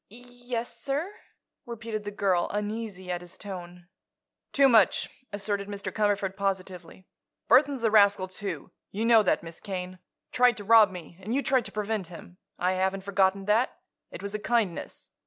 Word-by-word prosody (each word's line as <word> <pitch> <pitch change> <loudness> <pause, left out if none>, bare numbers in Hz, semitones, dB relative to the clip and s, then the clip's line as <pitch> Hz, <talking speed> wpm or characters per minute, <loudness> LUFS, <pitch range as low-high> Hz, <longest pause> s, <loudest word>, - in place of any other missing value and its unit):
"Yes, 245 +1 -6
sir," 295 +8 -2 0.5
repeated 225 -2 -5
the - - -2
girl, 195 -4 +1
uneasy 205 -3 -4
at 175 0 -3
his 175 0 -10
tone. 180 -3 -8 0.6
"Too 275 -1 +5
much," 230 -4 +4 0.2
asserted 200 0 -2
Mr. 200 -1 -5
Cumberford, 205 -2 0
positively. 190 -2 -4 0.4
"Burthon's 265 0 +4
a 225 - +3
rascal, 200 -3 +5
too. 195 +2 -6 0.2
You 215 +3 -2
know 230 -1 +7
that, 205 - +1
Miss 165 0 -9
Kane. 185 -2 -6 0.3
Tried 250 -2 +4
to 205 - -6
rob 220 -1 +7
me; 175 -2 -10
and 215 +6 -3
you 280 - +1
tried 255 -1 +2
to - - -7
prevent 210 -3 -2
him. 180 +1 -12 0.2
I 180 +1 +1
haven't 190 +1 -1
forgotten 195 0 +1
that; 220 +5 +2 0.3
it - - -9
was 200 0 -4
a 215 - -2
kindness. 215 -6 -2
205 Hz, 165 wpm, -27 LUFS, 185-230 Hz, 0.6 s, know